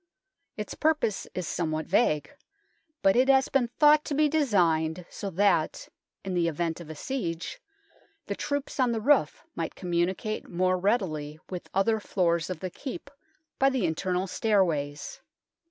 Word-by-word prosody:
Its 210 - -5
purpose 305 -10 0
is 180 -3 -3
somewhat 155 -2 -2
vague, 190 - +1 0.7
but 195 0 +5
it 255 +2 +4
has 265 -1 +4
been 270 -4 +2
thought 300 +4 +5
to 290 - -3
be 305 +1 +4
designed 180 - +1
so 200 - -5
that, 185 -3 +1 0.4
in 190 -1 -2
event 170 0 0
of 170 -3 -10
a 160 - -6
siege, 225 - -4 0.6
the - - -3
troops 285 -1 -3
on 250 -2 +3
the 225 - -1
roof 250 - +2
might 165 -1 -4
communicate 180 +4 -2
more 185 +1 +1
readily 165 -8 -1
with 180 -2 -6
other 220 +3 +2
floors 170 -5 0
of 180 -4 -5
the 185 -1 -4
Keep 280 - -7 0.5
by 270 - +5
the 260 -7 0
internal 180 +3 -1
stairways. 170 -9 0
190 Hz, 150 wpm, -28 LUFS, 170-250 Hz, 0.7 s, but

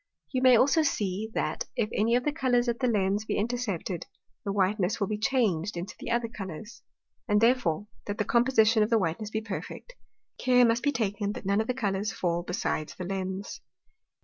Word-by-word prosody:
You 255 - 0
may 255 -1 +7
also 280 +7 +4
see, 215 -7 -1
that, - - -1
if 215 - +1
any 230 +3 +2
of 250 - +1
the 295 - +1
Colours 255 -5 +1
at 235 0 -1
the 255 - +1
Lens 205 -2 +1
be - - -2
intercepted, 205 -6 -2 0.4
the 200 - -2
whiteness 195 +1 +1
will 200 - +1
be 210 +1 -3
changed 210 -8 +1
into 180 +4 -5
the - - -6
other 235 0 +1
Colours. 205 -1 -8 0.5
And 210 -2 +3
therefore, 225 -7 +2 0.2
that 205 0 -3
the 210 - 0
Composition 235 -2 +4
of 210 - +2
whiteness 210 -2 0
be 220 0 -2
perfect, 220 - -7 0.5
care 250 -1 +5
must 230 +1 +2
be 285 - +2
taken 205 -4 -1
that - - -8
none 200 +2 +2
of 220 - -4
the 250 - -1
Colours 205 -3 -1
fall 175 -1 -1
besides 175 -3 -3
the 185 - -6
Lens. 190 +1 -4
215 Hz, 195 wpm, -28 LUFS, 195-240 Hz, 0.5 s, may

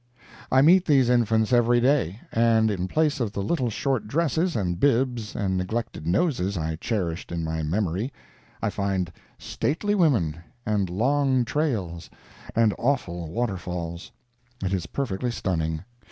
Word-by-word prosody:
I 130 +1 +6
meet 180 +4 +6
these 135 -6 +4
infants 115 -1 +2
every 120 0 +4
day; 120 - +1
and 115 -1 +3
in 95 -2 -2
place 155 +4 +1
of 110 -5 -1
the 100 - -2
little 130 0 0
short 130 +1 -1
dresses 165 +5 0
and 90 -4 -1
bibs 120 -4 +1
and 95 -3 0
neglected 90 -3 -3
noses 100 - +1
I 80 -1 -2
cherished 90 -4 -3
in 85 -1 -2
my 80 0 -2
memory, 95 - -1 0.5
I - - +1
find 95 -3 -1 0.3
stately 205 +8 -1
women, 120 - +2 0.3
and 105 -3 0
long 130 +5 +2
trails, 105 - -2 0.5
and 110 -2 +4
awful 90 - -1
waterfalls. 90 -4 -4 0.5
It 95 - -1
is 90 -3 -2
perfectly 125 -3 -2
stunning. 80 -7 -2
110 Hz, 140 wpm, -25 LUFS, 90-130 Hz, 0.5 s, I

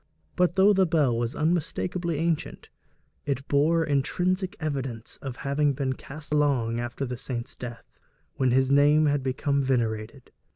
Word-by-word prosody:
But 180 -1 +2
though 195 +2 +6
the 190 -2 +3
bell 150 -7 +2
was 120 +3 -2
unmistakably 170 +1 -1
ancient, 165 0 -2 0.6
it 140 0 -2
bore 160 +4 +3
intrinsic 180 +6 0
evidence 135 -7 -4
of 135 -3 -5
having 140 +1 +2
been 135 -1 -1
cast 145 +3 -8
long 130 -6 +1
after 120 +3 -3
the 125 -1 -5
saint's 120 -2 -5
death, 120 -2 -10 0.3
when 130 -1 +1
his 130 +2 +2
name 145 +2 +5
had 145 -1 +2
become 140 +2 0
venerated. 120 -1 -2
140 Hz, 150 wpm, -26 LUFS, 125-155 Hz, 0.6 s, though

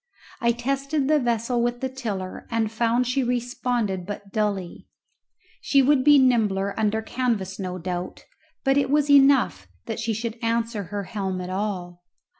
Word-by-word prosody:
I 235 -3 +3
tested 275 +4 -1
the 305 0 +4
vessel 235 -1 0
with 240 0 -1
the 265 - -1
tiller 215 -8 -5
and 225 -2 0
found 235 +2 +1
she 255 +2 0
responded 245 -5 -1
but 200 -1 -7
dully; 200 -5 -2 0.7
she 275 -1 +3
would 275 -1 +3
be 295 +1 +7
nimbler 210 -7 +2
under 220 0 0
canvas 220 -6 -2
no 185 -1 -4
doubt, 180 0 -5 0.4
but 270 0 +3
it 275 -2 +2
was 290 0 +2
enough 270 - +4 0.2
that 225 - -4
she 225 0 -1
should 230 +1 -4
answer 230 -2 -1
her 205 +2 -4
helm 190 -2 -3
at 180 0 -5
all. 185 -3 -4
230 Hz, 160 wpm, -24 LUFS, 200-255 Hz, 0.7 s, be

